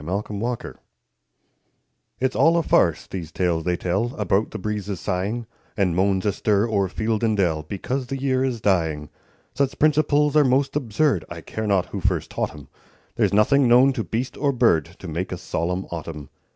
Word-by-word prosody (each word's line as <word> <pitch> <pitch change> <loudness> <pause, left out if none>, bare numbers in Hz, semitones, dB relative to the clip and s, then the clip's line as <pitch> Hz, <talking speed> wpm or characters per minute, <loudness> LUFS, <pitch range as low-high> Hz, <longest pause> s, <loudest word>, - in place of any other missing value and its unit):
MERRY 90 +5 -2
AUTUMN 105 +3 -4 1.5
It's 130 0 0
all 165 +1 +4
a 170 - +2
farce, - - +2
these 85 -4 -7
tales 85 -3 0
they 90 -1 +1
tell 100 +9 -1
About 105 +1 +1
the - - -6
breezes 105 -2 -4
sighing, 100 +7 -2 0.3
And 95 -5 +1
moans 95 +1 +1
astir 105 +1 +1
o'er 100 -4 +1
field 110 +4 -2
and 110 -2 +2
dell, 85 -5 +1
Because 125 - -4
the 135 - -3
year 130 -1 0
is 125 -4 -2
dying. 80 -7 0 0.4
Such 140 -1 -1
principles 150 -1 +3
are 150 - +6
most 135 +1 +1
absurd, 130 - +1
I 85 -1 -7
care 110 +7 -5
not 95 -3 +2
who - - -5
first - - -1
taught - - -1
'em; 75 -2 -12 0.5
There's - - +2
nothing 125 +6 +4
known 125 +3 +6
to 120 -4 -2
beast 120 +5 -3
or 140 -1 +1
bird 115 - +3
To - - -9
make 85 +4 -4
a 90 - -3
solemn 90 +1 -2
autumn. 80 -4 -6
105 Hz, 180 wpm, -23 LUFS, 90-130 Hz, 1.5 s, are